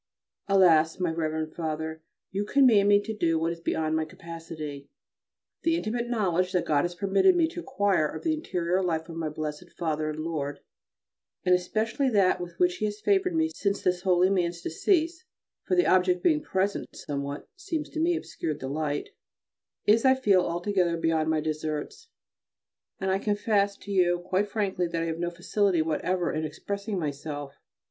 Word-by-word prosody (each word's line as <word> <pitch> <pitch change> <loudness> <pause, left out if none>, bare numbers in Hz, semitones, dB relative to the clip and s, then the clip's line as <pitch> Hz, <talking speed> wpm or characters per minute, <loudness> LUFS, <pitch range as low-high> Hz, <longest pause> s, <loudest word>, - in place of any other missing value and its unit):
Alas! 170 -5 +4
my 180 -3 +1
Rev. 155 -1 -2
Father, 160 -1 -4 0.3
you 195 +1 -1
command 220 -4 +5
me 205 0 +6
to 220 - -4
do 165 -5 +1
what 165 +1 0
is 170 - -11
beyond 160 -2 -1
my 160 - +1
capacity. 155 -3 -8 0.7
The 330 0 +2
intimate 240 -5 -2
knowledge 185 -6 +1
that 180 - +1
God 145 0 +2
has 175 0 -4
permitted 200 - +3
me 335 -2 +3
to 345 - -7
acquire 205 - +1
of - - -7
the 320 - +2
interior 185 - -1
life 165 -2 -1
of 165 - -7
my 165 -2 -2
blessed 155 +2 -5
Father 155 -2 -1
and 155 0 -4
Lord, 145 -3 -3 0.8
and 180 - +5
especially 220 +9 +1
that 195 -6 +3
with 175 -1 -7
which 180 -1 +2
He 215 - -1
has 210 0 -3
favoured 375 - +2
me 320 0 +2
since 200 -1 -1
this 180 -1 +1
holy 185 0 +3
man's 175 -3 0
decease 335 - +1 0.4
(for - - +1
the 360 - +4
object 180 -1 +3
being 310 -3 +3
present 195 -7 -1
somewhat, 140 0 -4
it 370 - -23
seems 330 -6 -3
to 315 - -5
me, 340 +2 +2
obscured 155 - -4
the 130 - -5
light), 145 0 -2 0.8
is, 220 +2 +4
I 260 -1 +6
feel, 205 -8 +4
altogether 175 0 0
beyond 165 -1 +1
my 160 -1 +1
deserts: 155 - -4 0.9
and 190 0 0
I 190 - +1
confess 205 -1 +1
to 205 - -9
you 175 -2 +3
quite 190 +3 0
frankly 195 -5 -1
that 165 0 -2
I - - -1
have 165 0 -3
no 175 0 -1
facility 175 0 +1
whatever 175 +3 -1
in 155 - -2
expressing 200 +6 -4
myself. 145 -2 -4
180 Hz, 180 wpm, -27 LUFS, 160-210 Hz, 0.9 s, me